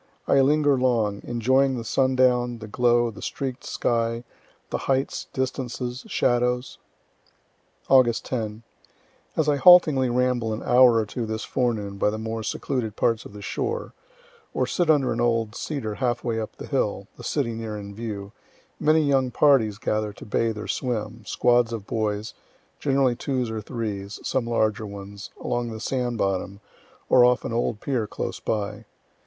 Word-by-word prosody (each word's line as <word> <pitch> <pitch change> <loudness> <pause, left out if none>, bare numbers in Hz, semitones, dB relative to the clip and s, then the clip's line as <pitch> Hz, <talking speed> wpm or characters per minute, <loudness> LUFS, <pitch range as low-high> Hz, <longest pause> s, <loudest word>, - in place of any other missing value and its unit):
I 140 - +5
linger 145 0 +3
long, 115 -5 +1
enjoying 130 +3 +2
the 115 - -4
sundown, 125 -1 +2
the 110 -1 -9
glow, 120 +1 +2
the 105 - -12
streak'd 135 -1 -4
sky, 115 0 -1 0.5
the - - -1
heights, 135 0 0
distances, 130 -1 -3
shadows. 125 +1 0 1.1
Aug. 125 -4 +5
10. 110 -3 -4 0.7
As 160 - +2
I 145 -1 +3
haltingly 150 -6 +7
ramble 120 -2 +1
an 110 - -5
hour 125 -1 +6
or 110 -1 +2
two 115 +2 -4
this 110 0 -3
forenoon 105 -6 -2
by - - +3
the 110 - -3
more 110 0 -4
secluded 110 0 -3
parts 115 -1 +1
of - - -11
the 105 0 -9
shore, 470 - -3 0.6
or - - +2
sit 175 -3 0
under 140 -6 +3
an 115 - -2
old 115 -2 +1
cedar 120 -5 -4
half 120 +1 -1
way 115 -2 -1
up 110 - -5
the - - -8
hill, 105 -8 -1
the - - -12
city 130 -6 -1
near 110 -2 -5
in 100 -1 -8
view, 100 -2 -6 0.5
many 155 +1 +4
young 135 -3 +2
parties 120 -6 +3
gather 110 -1 -1
to - - -12
bathe 110 +1 0
or 105 - -6
swim, 115 -3 -3
squads 120 -1 +3
of 110 -4 -5
boys, 105 -1 -2 0.5
generally 135 -3 +2
twos 125 -3 -2
or 110 -1 -3
threes, 105 -3 -5
some 130 -3 -1
larger 110 -2 0
ones, 100 0 -9
along 120 -1 -2
the 110 -1 -6
sand 125 0 -2
bottom, 95 0 -1 0.5
or 125 - +6
off 125 0 +3
an - - -3
old 115 -2 -1
pier 120 -5 -1
close - - -4
by. 105 +1 -3
120 Hz, 165 wpm, -25 LUFS, 110-130 Hz, 1.1 s, haltingly